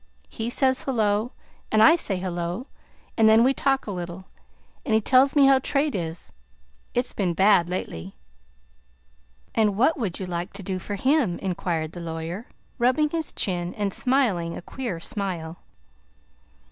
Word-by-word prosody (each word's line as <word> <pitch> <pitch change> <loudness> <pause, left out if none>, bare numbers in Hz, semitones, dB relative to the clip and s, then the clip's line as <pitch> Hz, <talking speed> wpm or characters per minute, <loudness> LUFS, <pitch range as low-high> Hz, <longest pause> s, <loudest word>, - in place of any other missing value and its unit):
He 225 +1 -4
says 260 +1 +2
'Hello!' 220 -2 0 0.4
and 215 0 +5
I 320 - +8
say 205 - -1
'Hello!' 175 +4 -3 0.5
and 220 -1 +5
then 220 +1 +6
we 265 +2 +4
talk 270 0 +1
a 210 - -4
little, 175 0 -6 0.6
and 225 -6 +1
he - - +5
tells 260 +5 +4
me 285 -2 +6
how 270 -1 +6
trade 285 +3 0
is. 165 -3 -5 0.6
It's 245 +1 0
been 180 -4 -1
bad 195 -3 +4
lately." 95 - -5 1.4
"And 210 -3 +2
what 280 +6 +3
would 200 -8 -2
you 190 - -4
like 175 +1 -4
to 200 0 -8
do 185 0 -3
for 205 +3 -5
him?" 255 - +2
inquired 170 -4 -2
the 175 - -9
lawyer, 165 +6 -5 0.3
rubbing 260 +5 +2
his 325 -2 -2
chin 175 -2 -2
and 200 -2 -2
smiling 225 -11 +1
a - - -7
queer 235 -9 -5
smile. 175 -5 -5
205 Hz, 160 wpm, -25 LUFS, 175-255 Hz, 1.4 s, I